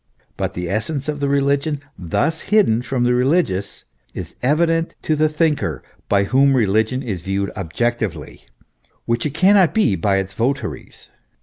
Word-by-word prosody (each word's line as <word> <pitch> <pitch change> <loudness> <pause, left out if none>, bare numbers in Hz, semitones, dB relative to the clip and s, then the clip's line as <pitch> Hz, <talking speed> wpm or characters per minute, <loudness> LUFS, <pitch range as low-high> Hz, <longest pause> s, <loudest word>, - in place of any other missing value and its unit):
But - - -3
the 90 0 -3
essence 120 - -2
of 150 -1 -3
reli 140 0 +2
gion, 145 0 -3 0.2
thus 155 - -1
hidden 195 - +3
from 125 0 -1
the 125 0 +3
religious, 125 - 0 0.3
is 85 -2 -7
evident 165 +5 +1
to 155 - +1
the 155 +1 +2
thinker, 155 -1 0 0.3
by 100 -1 +3
whom 135 +6 +3
religion 110 +3 +1
is 100 -9 -4
viewed 95 +2 -2
objectively, 95 - -3 0.6
which 115 +3 0
it 145 - -8
cannot 190 +1 +4
be 215 - +3
by 95 +3 +1
its 95 0 -3
votaries. 130 +6 -4
125 Hz, 150 wpm, -20 LUFS, 100-150 Hz, 0.6 s, cannot